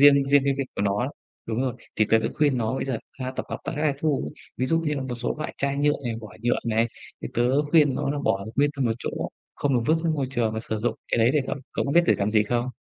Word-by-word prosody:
riêng 140 Hz, -1 st, +7 dB
riêng 140 Hz, 0 st, +4 dB
cái 140 Hz, -1 st, +2 dB
việc 135 Hz, -, +1 dB
của -, -, 0 dB
nó 105 Hz, +5 st, +1 dB, 0.4 s
đúng 115 Hz, +3 st, -1 dB
rồi, 130 Hz, -3 st, -1 dB, 0.2 s
thì 110 Hz, -, +4 dB
tớ 115 Hz, -, +6 dB
đã 110 Hz, -, -1 dB
khuyên 145 Hz, -4 st, +2 dB
nó 115 Hz, +2 st, 0 dB
bây -, -, -1 dB
giờ 130 Hz, -4 st, -2 dB, 0.2 s
ha 130 Hz, 0 st, -2 dB
tập -, -, -3 dB
hợp -, -, -3 dB
tại -, -, -3 dB
các 150 Hz, -, -1 dB
lãi 150 Hz, -3 st, +2 dB
thu. 150 Hz, -3 st, 0 dB, 0.2 s
Ví 130 Hz, -, 0 dB
dụ 165 Hz, +4 st, +2 dB
như 150 Hz, -2 st, -1 dB
là 135 Hz, -, -2 dB
một 130 Hz, -2 st, -4 dB
số 120 Hz, 0 st, -2 dB
loại 155 Hz, -, -4 dB
chai 140 Hz, 0 st, 0 dB
nhựa 145 Hz, +1 st, +3 dB
này, 120 Hz, -2 st, -1 dB
vỏ 110 Hz, -, -9 dB
nhựa 120 Hz, +1 st, +2 dB
này, 115 Hz, +1 st, +2 dB, 0.3 s
thì -, -, -3 dB
tớ 125 Hz, +5 st, +3 dB
khuyên 150 Hz, -5 st, +5 dB
nó -, -, -1 dB
là 145 Hz, -, -1 dB
bỏ 100 Hz, 0 st, +1 dB
nguyên 145 Hz, +2 st, +4 dB
ra 135 Hz, -, 0 dB
một 115 Hz, -, +2 dB
chỗ, -, -, -3 dB, 0.4 s
không 140 Hz, -2 st, 0 dB
được 120 Hz, -, +3 dB
vứt 160 Hz, -, +4 dB
ra 165 Hz, -, +2 dB
môi 145 Hz, -4 st, 0 dB
trường 120 Hz, -4 st, +1 dB
và 110 Hz, -, -2 dB
sử 110 Hz, -1 st, -3 dB
dụng 115 Hz, -, 0 dB, 0.2 s
cái -, -, +3 dB
đấy 115 Hz, +1 st, +5 dB
để 150 Hz, -, +4 dB
cậu -, -, -1 dB, 0.2 s
cậu -, -, 0 dB
có 140 Hz, -, -1 dB
biết 170 Hz, -, +6 dB
để -, -, +5 dB
làm 100 Hz, +1 st, +1 dB
gì 105 Hz, -1 st, +4 dB
không? 120 Hz, +3 st, 0 dB
130 Hz, 305 wpm, -25 LUFS, 115-145 Hz, 0.4 s, riêng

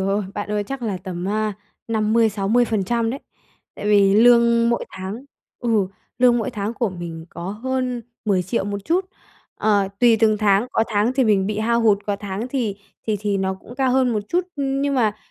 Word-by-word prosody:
ôi, 195 Hz, +1 st, 0 dB
bạn 205 Hz, 0 st, -4 dB
ơi! 210 Hz, -1 st, 0 dB
Chắc 270 Hz, +4 st, -6 dB
là 210 Hz, -5 st, -2 dB
tầm 180 Hz, -1 st, -6 dB
á, 215 Hz, +1 st, 0 dB, 0.4 s
50%-60% 225 Hz, 0 st, +1 dB
đấy. 270 Hz, +3 st, -5 dB, 0.5 s
Tại -, -, -6 dB
vì 200 Hz, -2 st, +5 dB
lương 235 Hz, +1 st, +5 dB
mỗi 235 Hz, -, 0 dB
tháng 195 Hz, +8 st, -7 dB, 0.3 s
ừ, 225 Hz, -5 st, +1 dB, 0.3 s
lương 245 Hz, -1 st, +5 dB
mỗi 225 Hz, -, -2 dB
tháng 210 Hz, +2 st, -3 dB
của 235 Hz, -2 st, 0 dB
mình 170 Hz, -2 st, -7 dB
có 175 Hz, +2 st, -6 dB
hơn 250 Hz, +2 st, -2 dB, 0.2 s
10.000.000 190 Hz, +1 st, 0 dB
một 200 Hz, 0 st, -3 dB
chút. 360 Hz, +3 st, +1 dB, 0.5 s
Ờ, 205 Hz, -2 st, +2 dB
tùy 235 Hz, -2 st, +6 dB
từng 215 Hz, -2 st, +4 dB
tháng, 205 Hz, +1 st, +3 dB
có 225 Hz, -, +2 dB
tháng 215 Hz, +3 st, +1 dB
thì 260 Hz, -1 st, +2 dB
mình 200 Hz, -3 st, +3 dB
bị 210 Hz, 0 st, -2 dB
hao 235 Hz, +2 st, +1 dB
hụt, 215 Hz, -3 st, +4 dB
có 205 Hz, -, 0 dB
tháng 200 Hz, +3 st, -5 dB
thì 240 Hz, -7 st, -2 dB, 0.3 s
thì 215 Hz, -, +1 dB
thì 205 Hz, -1 st, 0 dB
nó 190 Hz, 0 st, -1 dB
cũng 220 Hz, +5 st, -13 dB
cao 260 Hz, -1 st, +1 dB
hơn 260 Hz, -1 st, +3 dB
một 215 Hz, -, 0 dB
chút 355 Hz, +7 st, +2 dB, 0.2 s
nhưng 275 Hz, 0 st, 0 dB
mà, 220 Hz, -5 st, +1 dB
215 Hz, 190 wpm, -21 LUFS, 200-240 Hz, 0.5 s, tùy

